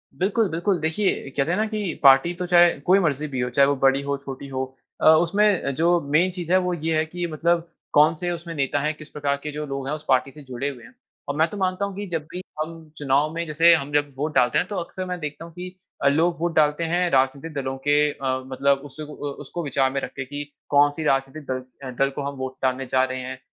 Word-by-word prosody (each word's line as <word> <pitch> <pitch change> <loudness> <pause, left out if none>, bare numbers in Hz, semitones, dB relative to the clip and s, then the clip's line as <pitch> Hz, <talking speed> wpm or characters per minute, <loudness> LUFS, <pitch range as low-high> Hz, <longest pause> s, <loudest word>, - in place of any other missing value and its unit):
बिल्कुल, 200 +2 +1
बिल्कुल। 175 +2 0
देखिए 160 -2 0
कहते 140 +4 +1
है 180 - +1
ना 215 - +2
कि 210 -6 -3
पार्टी 135 +5 +6
तो 180 - -4
चाहे 175 -1 +7 0.2
कोई 190 +2 +5
मर्ज़ी 155 -3 0
भी 130 -3 -4
हो 125 0 0
चाहे 140 +3 +4
वो 145 - +2
बड़ी 135 0 +3
हो, 140 0 -2
छोटी 140 0 -8
हो 130 0 -4 0.3
अ, - - +1
उसमें 175 -2 +2
जो 170 +3 +3
मेन 155 +6 +2
चीज़ 175 -2 -6
है 185 - +6
वो 180 -1 -1
ये 160 -1 -1
है 160 - +2
कि 175 +2 -4
मतलब 170 +2 +1 0.3
कौन-से 160 +4 +4
उसमें 170 0 -6
नेता 140 0 0
हैं 150 +2 0
किस 155 -1 -12
प्रकार 140 -1 -1
के 150 - -4
जो 150 +1 -4
लोग 135 -1 -5
हैं 150 - -1
उस 155 0 -11
पार्टी 130 +1 +2
से 150 - -13
जुड़े 130 +2 -3
हुए 130 -4 -10
हैं। - - -15 0.4
अ, - - 0
मैं 160 +3 +2
तो 210 - -7
मानता 190 +1 0
हूँ 200 - -6
कि 205 +1 -4
जब 160 -3 -1
भी 180 - -5 0.2
हम 160 0 -7
चुनाव 145 +1 +2
में 170 +1 -3
जैसे 165 +3 +5
हम 145 -2 0
जब 145 -1 +1
वोट 150 +2 -2
डालते 125 -1 +3
हैं 180 - +1
तो 205 - -5
अक्सर 185 +2 -6
मैं 180 -1 -4
देखता 150 +1 -6
हूँ 170 - -12
कि 180 +1 -7 0.3
अ, - - +5
लोग 165 +4 +2
वोट 170 0 -1
डालते 150 +1 +3
हैं 180 0 +2
राजनीतिक 135 +4 +1
दलों 135 -1 -3
के 145 0 +5
अ, 130 -2 -2
मतलब 140 +1 +2
उस 145 +2 -13
अ - - -3
उसको 145 +2 -6
विचार 135 -2 +1
में 135 - -2
रख - - -5
के 130 - -4
कि 145 +2 -5 0.3
कौन-सी 145 +2 +3
राजनीतिक 135 +1 0
दल 130 0 -6
दल 135 - +3
को - - -3
हम - - -11
वोट 130 0 -5
डालने 130 0 0
जा 130 0 +4
रहे 130 0 -2
हैं। 130 0 -6
150 Hz, 255 wpm, -23 LUFS, 135-170 Hz, 0.4 s, चाहे